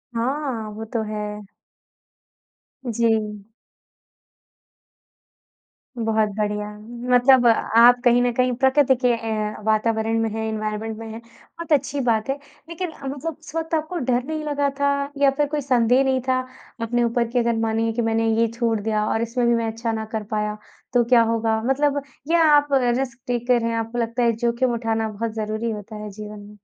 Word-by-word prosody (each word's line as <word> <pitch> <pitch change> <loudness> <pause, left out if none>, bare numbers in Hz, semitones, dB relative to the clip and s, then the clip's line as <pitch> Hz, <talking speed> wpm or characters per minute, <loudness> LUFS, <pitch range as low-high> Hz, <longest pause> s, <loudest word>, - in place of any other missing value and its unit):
हाँ, 250 -2 -2
वो 220 +1 -6
तो 230 - 0
है। 210 -1 -5 1.4
जी। 220 -3 0 2.5
बहुत 220 -2 +1
बढ़िया 210 0 -1 0.4
मतलब 250 0 +6
अ, - - +7
आप 240 +2 +5
कहीं 245 0 +5
न 245 0 +2
कहीं 255 +1 +2
प्रकृति 265 +1 +4
के - - +5
ए 225 -1 -3 0.3
वातावरण 220 +1 +1
में 225 - 0
हैं, 220 +1 -3
एनवायरनमेंट 215 0 -3
में 225 0 -8
हैं, 225 - -7
बहुत 320 +8 -13
अच्छी 285 0 +1
बात 220 +2 +1
है। 270 - +1 0.3
लेकिन 335 +1 -4
मतलब 280 +4 -4
उस 310 0 -13
वक़्त 325 0 -3
आपको 315 +3 -2
डर 250 -4 0
नहीं 310 +2 -4
लगा 285 -1 0
था 280 0 +3 0.3
या 280 -1 +4
फिर 295 - +2
कोई 295 0 -2
संदेह 250 -1 +3
नहीं 265 -1 +1
था 255 0 +2 0.4
अपने 240 +1 +1
ऊपर 235 0 +1
कि 245 +1 0
अगर 235 -1 +1
मानिए 225 0 0
कि 240 - -1
मैंने 225 0 +1
ये 230 - +4
छोड़ 230 -3 +1
दिया 215 0 0
और 225 - 0
इसमें 235 +1 0
भी 235 - +4
मैं 230 -1 0
अच्छा 230 +1 -3
ना 220 -1 -3
कर 220 -1 -2
पाया, 210 0 -1 0.4
तो 245 - +4
क्या 235 0 +5
होगा? 225 -1 0
मतलब 285 +2 +1 0.3
या 335 -1 +4
आप 290 0 +5
रिस्क 250 -1 +1
टेकर 245 0 +1
हैं, 230 0 0
आपको 225 +1 -3
लगता 235 +1 -1
है 235 - +4
जोख़िम 235 +2 0
उठाना 225 -1 -1
बहुत 225 +2 -4
ज़रूरी 220 +1 -2
होता 210 +1 -7
है 210 0 -6
जीवन 210 +1 -8
में? 205 +1 -13
235 Hz, 180 wpm, -22 LUFS, 220-260 Hz, 2.5 s, अ